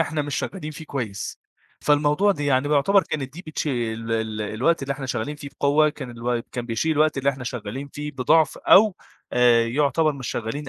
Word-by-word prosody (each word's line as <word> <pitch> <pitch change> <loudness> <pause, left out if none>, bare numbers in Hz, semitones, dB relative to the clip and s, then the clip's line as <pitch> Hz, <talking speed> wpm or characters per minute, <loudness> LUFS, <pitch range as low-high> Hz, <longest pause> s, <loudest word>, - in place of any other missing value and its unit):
إحنا 155 -1 0
مش 145 -1 -4
شغالين 165 -6 -4
فيه 155 +1 -9
كويس، 115 -9 -5 0.4
فالموضوع 150 +7 +3
ده 145 -5 -4
يعني 140 0 +2
بيعتبر 170 +7 +4
كانت 135 -3 -4
دي 175 +5 -9
بتش 155 - -4
ال 115 -4 -2
ال 110 -1 -2
الوقت 125 +11 0
اللي 140 0 -1
إحنا 135 -1 -6
شغالين 125 +4 -3
فيه 140 - -8
بقوة 150 +2 +4
كان 135 -4 -7
الو 120 0 -2
كان 120 -1 -4
بيشيل 120 +8 0
الوقت 155 -1 +2
اللي 140 +1 +2
إحنا 130 -2 -8
شغالين 125 +3 -5
فيه 150 +1 -6
بضَعف 150 +4 +2
أو 205 -1 +5 0.4
آآ 120 -1 +4
يعتبر 145 +5 +2
مش 135 -3 -6
شغالين 135 +6 -4
140 Hz, 195 wpm, -23 LUFS, 120-150 Hz, 0.4 s, أو